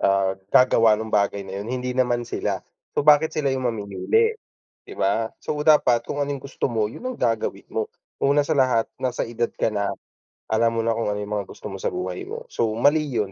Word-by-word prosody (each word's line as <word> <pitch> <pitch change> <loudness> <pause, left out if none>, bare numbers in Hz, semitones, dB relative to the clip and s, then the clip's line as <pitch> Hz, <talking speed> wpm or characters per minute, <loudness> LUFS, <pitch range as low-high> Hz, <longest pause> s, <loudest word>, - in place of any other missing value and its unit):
ah, 95 -1 +3 0.2
gagawa 115 -2 +5
nung 110 +1 -5
bagay 100 -1 +1
na 95 0 -6
'yun, 105 - -6
hindi 125 0 -2
naman 125 -1 +1
sila. 115 - -3 0.3
So - - +3
bakit 150 +1 +5
sila 145 -3 +1
'yung 130 -1 -1
mamimili, 120 - 0 0.5
'di - - -11
ba? 110 +3 +1
So - - -3
dapat 130 -6 +5
kung 145 - -4
ano 145 - 0
'yung 135 - -8
gusto 140 - -2
mo, 110 -3 0
'yun 255 - -8
ang 255 - -5
gagawin 115 -3 -1
mo. - - -1 0.3
Una 140 +1 +4
sa 160 - -1
lahat 125 -4 +3 0.2
nasa 125 -1 -1
edad 120 0 -2
ka - - 0
na, 100 -1 0 0.6
alam 115 +1 +2
mo 115 - +1
na 115 - +2
kung 115 - -1
ano 105 0 -1
'yung 105 +1 -5
mga 100 - -4
gusto - - -9
mo - - -6
sa - - -1
buhay 370 +1 -4
mo. 460 +4 -6
So - - +1
mali 145 +7 +4
'yun, 110 -8 -2
120 Hz, 220 wpm, -23 LUFS, 110-140 Hz, 0.6 s, gagawa